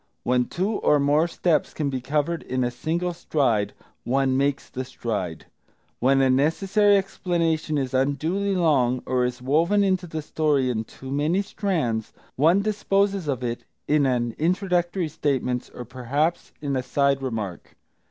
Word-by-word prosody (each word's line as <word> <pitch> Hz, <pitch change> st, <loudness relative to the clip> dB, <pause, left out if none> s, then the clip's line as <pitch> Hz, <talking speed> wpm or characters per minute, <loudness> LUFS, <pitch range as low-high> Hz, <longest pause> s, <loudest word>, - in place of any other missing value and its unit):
When 125 Hz, 0 st, +2 dB
two 195 Hz, -, -1 dB
or 150 Hz, -, +3 dB
more 145 Hz, +4 st, +3 dB
steps 170 Hz, -2 st, 0 dB
can 145 Hz, -3 st, -1 dB
be 130 Hz, -1 st, -3 dB
covered 150 Hz, +5 st, -1 dB
in 130 Hz, 0 st, -2 dB
a 120 Hz, -, 0 dB
single 170 Hz, +7 st, -2 dB
stride, 135 Hz, -11 st, 0 dB, 0.3 s
one 135 Hz, +1 st, +1 dB
makes 140 Hz, +1 st, 0 dB
the 130 Hz, -, -5 dB
stride. 100 Hz, -, -4 dB, 0.5 s
When 135 Hz, +2 st, +3 dB
a 135 Hz, -, +4 dB
necessary 195 Hz, +9 st, +3 dB
explanation 165 Hz, -5 st, -1 dB
is 135 Hz, -2 st, -2 dB
unduly 160 Hz, +10 st, 0 dB
long, 130 Hz, -8 st, +2 dB
or 125 Hz, -1 st, +1 dB
is 125 Hz, 0 st, -4 dB
woven 170 Hz, +10 st, +3 dB
into 185 Hz, -2 st, +1 dB
the 160 Hz, -1 st, -5 dB
story 145 Hz, -4 st, +1 dB
in 110 Hz, -2 st, -2 dB
too 130 Hz, +4 st, -10 dB
many 155 Hz, +8 st, +1 dB
strands, 160 Hz, -, -2 dB, 0.2 s
one 170 Hz, +8 st, +4 dB
disposes 200 Hz, -3 st, 0 dB
of 130 Hz, -3 st, -2 dB
it 120 Hz, -1 st, -3 dB, 0.2 s
in 145 Hz, -2 st, +3 dB
an 120 Hz, -2 st, 0 dB
introductory 175 Hz, +1 st, 0 dB
statement, 135 Hz, -5 st, -1 dB
or 125 Hz, -, -8 dB
perhaps 135 Hz, +8 st, -2 dB
in 140 Hz, -2 st, -2 dB
a 130 Hz, -, 0 dB
side 140 Hz, +1 st, +1 dB
remark. 110 Hz, -8 st, -5 dB
145 Hz, 155 wpm, -24 LUFS, 130-175 Hz, 0.5 s, a